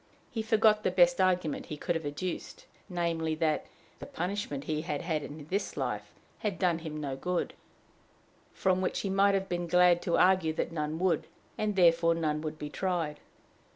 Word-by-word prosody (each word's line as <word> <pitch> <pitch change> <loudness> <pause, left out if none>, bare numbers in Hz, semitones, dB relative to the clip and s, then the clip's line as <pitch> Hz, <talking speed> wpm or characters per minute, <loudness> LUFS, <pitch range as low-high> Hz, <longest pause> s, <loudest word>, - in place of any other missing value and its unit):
He 230 -4 -2
forgot 220 -1 +4
the - - +2
best 175 0 +4
argument 180 -5 +1
he 150 - -5
could 175 - -1
have 165 -3 -3
adduced 170 +5 -5 0.2
namely, 165 -3 -1
that 155 -1 0 0.3
the - - -8
punishment 175 -6 -3
he 155 0 -2
had 150 -3 -3
had 160 -3 -1
in 145 0 -8
this 200 +2 -2
life - - -3 0.3
had 205 -4 -2
done 175 -3 +1
him 155 -2 -6
no 140 -3 -3
good; 180 +6 -2 1.0
from 185 -1 +1
which 185 - -1
he 195 - -2
might 200 +1 +4
have 195 0 -1
been 175 -1 -2
glad 180 0 +5
to 170 - +1
argue 185 -4 +4
that 165 - -2
none 155 -1 -2
would, 180 0 +1 0.3
and 210 -1 -1
therefore 170 -2 +5
none 155 -2 -1
would 155 0 -4
be 150 -1 -6
tried. 170 -5 -2
175 Hz, 185 wpm, -30 LUFS, 155-185 Hz, 1.0 s, glad